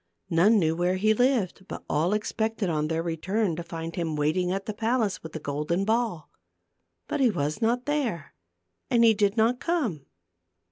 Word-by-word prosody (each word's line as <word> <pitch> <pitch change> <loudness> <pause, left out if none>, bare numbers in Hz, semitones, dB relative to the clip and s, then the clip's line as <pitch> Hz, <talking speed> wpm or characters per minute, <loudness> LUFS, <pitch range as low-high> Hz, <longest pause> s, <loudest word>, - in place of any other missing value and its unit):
None 190 +7 +5
knew 160 -4 +2
where 175 +2 +1
he 215 +3 +3
lived, 220 -6 0
but - - -7
all 165 +6 +1
expected 220 -2 -1
on 155 -1 0
their 165 +1 -1
return 175 +3 -1
to 170 - -4
find 165 -1 -6
him 165 -3 -2
waiting 155 +5 +1
at 195 +1 -2
the 215 - -3
palace 225 -1 0
with 160 - -9
the 160 - -4
golden 150 +6 -2
ball. 220 -7 -1 0.8
But 300 - -2
he 260 -3 +4
was 155 -2 -2
not 240 +2 +1
there 255 - -2 0.6
and 240 -3 +4
he 225 -1 +7
did 205 +1 +1
not 230 +3 +3
come. 245 - -2
195 Hz, 180 wpm, -26 LUFS, 165-225 Hz, 0.8 s, he